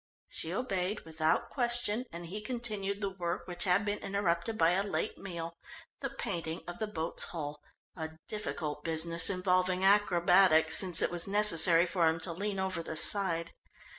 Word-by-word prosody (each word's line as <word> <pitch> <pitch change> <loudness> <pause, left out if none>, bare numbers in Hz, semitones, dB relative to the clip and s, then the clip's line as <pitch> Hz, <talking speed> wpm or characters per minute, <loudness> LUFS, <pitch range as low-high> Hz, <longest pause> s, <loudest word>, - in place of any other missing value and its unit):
She 160 - -3
obeyed 195 -2 -2
without 160 0 -1
question, 240 -2 -1
and 170 +1 -7
he 200 +5 -6
continued 210 -4 -3
the 200 -1 -1
work 175 -2 -4
which 175 +2 -2
had 190 +3 +2
been 205 0 -2
interrupted 195 +1 -1
by 165 -2 +4
a 185 +2 +2
late 200 - -3
meal, 170 -3 -6 0.4
the - - -3
painting 170 -6 -4
of 175 - -7
the 220 - -2
boat's 165 -5 -2
hull, 150 -3 -6 0.3
a 160 -2 -6
difficult 155 -8 -4
business, 165 +1 +1
involving 185 -1 +1
acrobatics, 180 -4 +4
since 185 -3 +3
it - - +1
was 175 +1 -1
necessary 175 -4 +4
for 175 -2 +1
him 160 +1 +1
to 170 0 -2
lean 200 +3 -3
over 190 -2 -1
the 160 - -6
side. 170 -1 +3
180 Hz, 165 wpm, -31 LUFS, 165-200 Hz, 0.4 s, by